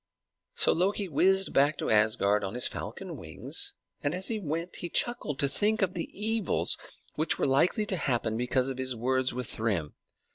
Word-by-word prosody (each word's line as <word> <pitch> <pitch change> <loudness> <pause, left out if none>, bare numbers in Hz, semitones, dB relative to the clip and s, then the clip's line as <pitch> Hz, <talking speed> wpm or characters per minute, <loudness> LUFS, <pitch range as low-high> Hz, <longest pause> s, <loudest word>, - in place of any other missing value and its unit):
So 465 - +5
Loki 195 +3 +1
whizzed 190 +5 +3
back 145 +2 +3
to - - -1
Asgard 105 -1 +3
on 95 +3 -4
his 125 - +3
falcon - - -6
wings; - - -3 0.3
and 145 +4 0
as 185 +1 -5
he 225 -2 -1
went 165 0 -3
he 175 - -4
chuckled 170 - 0
to 140 - +2
think 215 +8 +1
of 185 -1 0
the 170 - -4
evils 220 -2 0 0.4
which 155 +1 +1
were - - +1
likely 155 - +3
to 195 -2 -1
happen 120 -7 0
because 125 +2 +1
of 130 -1 -4
his 130 -1 -1
words 130 +2 +1
with 125 -1 -4
Thrym. 100 -9 -1
145 Hz, 185 wpm, -29 LUFS, 125-190 Hz, 0.4 s, So